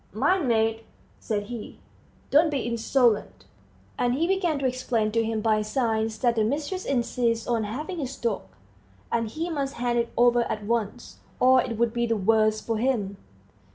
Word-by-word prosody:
"Mind, 370 -6 +2
mate," 225 -1 +1 0.3
said 205 -2 -2
he, 225 +1 -8 0.5
"don't 310 +3 +5
be 280 -4 -1
insolent." 235 0 +1 0.5
And 245 0 +2
he 320 +5 +1
began 360 -4 +1
to 275 - -2
explain 250 -4 0
to 230 +1 +1
him 225 -1 -2
by 215 -1 +2
signs 220 0 -1
that 240 -1 +1
the 220 - +3
mistress 300 - -2
insists 235 -3 0
on 230 -3 0
having 300 - -5
his 270 -3 -4
dog; 230 -4 -1 0.7
that 230 -1 +1
he 320 +10 -4
must 275 -3 -2
hand 240 0 0
it 235 0 -1
over 240 0 +5
at 210 - -3
once, 230 0 -3 0.2
or 255 0 +6
it 235 -3 -4
would 235 0 +1
be 235 -1 0
the 225 -1 +1
worse 215 +1 +3
for 225 0 -2
him. 220 -6 0
235 Hz, 175 wpm, -26 LUFS, 220-260 Hz, 0.7 s, or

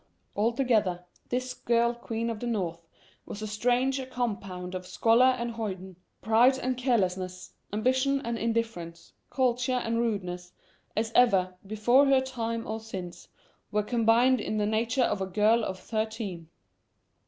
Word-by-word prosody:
Altogether, 215 -5 +1 0.2
this 255 +1 -2
girl 235 0 +1
Queen 230 -1 -3
of 220 - -5
the 240 - -4
North 170 -7 -3 0.4
was 210 - -6
as 215 - -4
strange 250 +5 +1
a 260 - -5
compound 195 -8 -4
of 185 0 -5
scholar 245 +5 +4
and 235 0 -3
hoyden, 190 -5 -5 0.3
pride 240 +4 +5
and 255 -1 -1
carelessness, 185 -7 -1 0.2
ambition 260 +6 +1
and 235 0 -1
indifference, 225 -8 -3 0.2
culture 255 -1 +1
and 230 -2 0
rudeness, 180 -6 -3 0.4
as 220 +1 0
ever, 190 -7 +4
before 240 +7 +4
her 270 -1 +5
time 230 -3 -3
or 220 +1 -4
since, 190 -6 -8 0.4
were 210 0 +1
combined 235 +2 +3
in 215 - -2
the 210 - +1
nature 230 +4 +1
of 205 -4 0
a 190 - -1
girl 215 +4 +3
of 190 -3 -3
thirteen. 215 -6 -4
225 Hz, 145 wpm, -28 LUFS, 195-245 Hz, 0.4 s, pride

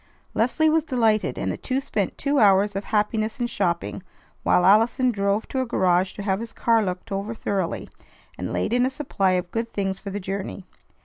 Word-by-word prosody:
Leslie 255 +8 +2
was 315 0 +3
delighted, 225 -7 +1
and - - -1
the - - -4
two 260 0 -1
spent 210 -7 -2
two 280 0 +1
hours 200 -1 +4
of 195 - -3
happiness 215 +2 0
in 240 - +1
shopping, 185 -6 -2 0.4
while 180 - +3
Allison 225 +6 +4
drove 200 0 0
to 260 - -1
a - - -1
garage 185 -3 +2
to 205 - -7
have 195 -1 0
his 230 0 -7
car 230 -1 +2
looked 180 0 -4
over 200 +3 -3
thoroughly, 195 -5 -2 0.5
and - - -5
laid - - -1
in 245 0 +3
a 255 - +2
supply 255 -9 0
of 180 -1 -1
good 230 0 -3
things 195 -1 -1
for 200 - -7
the 200 +1 -4
journey. 195 0 -5
210 Hz, 200 wpm, -24 LUFS, 195-235 Hz, 0.5 s, hours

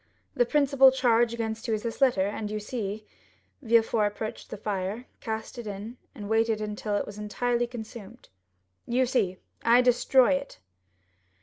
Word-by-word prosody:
The - - +2
principal 275 -3 +5
charge 240 -3 +3
against 225 -1 -4
you 225 - +1
is 210 - -6
this 230 +3 -5
letter, 240 -8 +4
and 210 +1 -4
you 215 0 -3
see——" 210 -1 -5 0.6
Villefort 225 -3 +3
approached 215 +1 -6
the - - -6
fire, 205 +3 -3
cast 220 +2 -5
it 235 - -7
in, 210 +4 -7 0.2
and 205 -5 -7
waited 225 0 +2
until 210 0 -3
it - - 0
was 205 0 -9
entirely 240 +3 -1
consumed. 230 -1 -10 0.6
"You 250 +2 +2
see, 195 -8 0 0.3
I 235 +2 +6
destroy 250 +1 +4
it?" 275 0 -2
225 Hz, 160 wpm, -27 LUFS, 210-245 Hz, 0.6 s, I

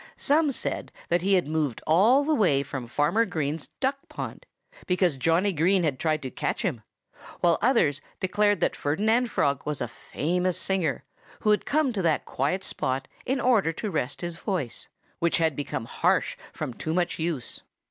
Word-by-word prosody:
Some 295 +1 +3
said - - -3 0.2
that 175 0 +2
he 195 +2 +3
had 180 -5 +1
moved 150 -6 -1
all 220 - +5
the 310 +2 +1
way 165 - +3
from 135 -3 -6
Farmer 150 - +2
Green's 155 -6 -2
duck 275 +1 0
pond, - - -7 0.4
because 180 -4 +2
Johnnie 165 +8 +2
Green 180 +4 +3
had 145 -5 0
tried 155 -2 0
to 130 - -5
catch - - -2
him; 155 - -1 0.6
while 170 -2 +4
others 205 - +3 0.2
declared 205 +2 +2
that - - +2
Ferdinand 220 +11 +1
Frog 140 -8 +1
was 150 -2 -3
a 120 - -1
famous 180 +9 -1
singer, 180 -8 0 0.4
who 215 - +3
had 210 - +1
come 300 -4 +2
to 200 - -1
that 165 -4 +1
quiet 150 +9 -1
spot 130 -5 -2 0.2
in 265 +1 +1
order 230 -9 +3
to 210 +5 -4
rest 140 -5 -2
his 170 -1 -4
voice, 175 - -3 0.3
which 170 0 +2
had 160 -3 +1
become 140 -5 -3
harsh - - +1 0.2
from 125 - -5
too 160 +6 -3
much 175 -2 0
use. 160 -6 -2
170 Hz, 180 wpm, -26 LUFS, 145-205 Hz, 0.6 s, all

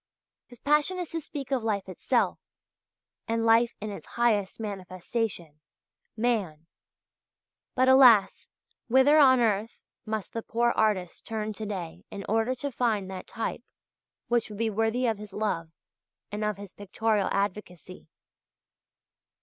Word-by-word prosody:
His 245 - -15
passion 300 +7 +2
is 355 -3 -4
to 330 -1 -3
speak 280 -3 -7
of 260 -4 0
life 205 -4 -1
itself, 185 - 0 0.9
and 230 0 0
life 230 +1 +4
in 210 0 -5
its 200 - -9
highest 220 -5 +1
manifestation 185 -4 -4 0.6
Man. 205 -10 -1 1.1
But, 255 0 +3
alas, 255 -6 +6 0.4
whither 265 +5 +5
on 260 -3 +7
earth 220 -1 0 0.3
must 215 -2 -4
the 230 - -3
poor 235 +1 +1
artist 205 -6 0
turn 215 -1 -3
to 215 +1 -6
day 180 -5 -6
in 200 -1 -7
order 225 +4 +1
to 280 +3 -4
find 220 -6 -1
that 185 -1 -7
type 225 - -4 0.7
which 235 -2 +1
would 210 - -8
be 225 0 0
worthy 225 +4 0
of 225 -3 0
his 210 -2 -10
love 195 -6 -2 0.6
and 210 +1 -3
of 210 -2 -1
his 200 -2 -10
pictorial 210 0 -1
advocacy? 185 -4 -4
220 Hz, 140 wpm, -27 LUFS, 200-240 Hz, 1.1 s, on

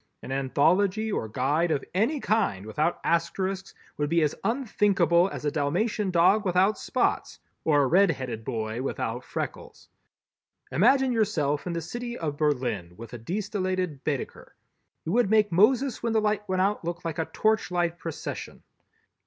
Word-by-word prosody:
An - - -7
anthology 180 +11 +2
or 110 - -2
guide 145 +9 +1
of 140 - -1
any 230 - +1
kind 205 - 0
without 150 +10 -1
Asterisks 185 +3 -1 0.2
would 145 -1 -1
be 165 0 +3
as 150 - +1
unthinkable 200 - +2
as - - -7
a 145 - +1
Dalmatian 190 +9 0
dog 185 +4 +4
without 190 +2 +2
spots - - -1 0.3
or 145 -3 +3
a - - +2
red 190 +7 +5
headed 125 -7 -4
boy 110 +1 -3
without 125 -2 -3
freckles. - - -6 0.8
Imagine 265 -1 +4
yourself 180 - 0
in 175 - -2
the 170 - -2
city 240 +8 -5
of 150 -3 -3
Berlin 125 - -1
with 115 +2 -10
a 120 - -6
de 170 - -3
stellated 185 -7 -2
Baedeker. 140 -4 -4 0.5
You 160 - -2
would 235 -1 +3
make 210 -2 +3
Moses 240 +8 +3
when 230 -1 -1
the 220 - +4
light 210 -1 -1
went 185 0 +2
out 200 0 0
look 170 0 -5
like 165 -1 -3
a 160 - 0
torchlight 180 -6 0
procession! 165 -2 -6
175 Hz, 160 wpm, -26 LUFS, 145-210 Hz, 0.8 s, red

